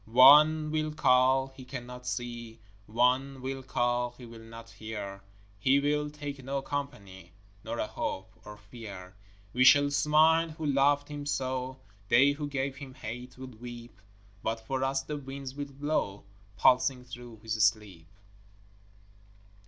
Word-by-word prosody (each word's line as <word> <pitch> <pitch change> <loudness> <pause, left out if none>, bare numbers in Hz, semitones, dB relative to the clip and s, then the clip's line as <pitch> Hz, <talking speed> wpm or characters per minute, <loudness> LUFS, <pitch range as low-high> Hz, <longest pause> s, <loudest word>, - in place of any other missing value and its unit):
One 150 +6 +7
will 155 0 -1
call, 130 -2 +3
he 130 - -10
cannot 125 -1 -8
see; 120 -2 -5 0.3
One 125 +4 +1
will 135 0 -4
call, 120 -1 -1
he 125 - -11
will 115 -1 -11
not 115 0 -12
hear; 105 -3 -7 0.4
He 130 +6 +4
will 150 +1 0
take 145 -2 -7
no 135 +1 -3
company 100 -12 -6 0.3
Nor 115 +1 -4
a - - -1
hope 95 -2 -4
or 105 0 -10
fear. 100 -3 -10 0.4
We 125 - +3
shall 145 +2 +6
smile 155 +3 +4
who 160 0 -6
loved 145 0 +3
him 145 -1 -6
so 130 -1 -2 0.3
They 135 +6 +5
who 145 +1 -4
gave 135 -1 -3
him 135 -2 -10
hate 125 0 -8
will 130 - -7
weep; 120 -3 -10 0.4
But 115 +2 -2
for 130 +2 -2
us 135 0 0
the 150 +2 -5
winds 135 -1 -7
will 145 +1 -4
blow 140 -8 -2 0.3
Pulsing 130 +3 +3
through 120 -2 -11
his 110 0 -3
sleep. 100 -6 0
130 Hz, 145 wpm, -29 LUFS, 115-140 Hz, 0.4 s, One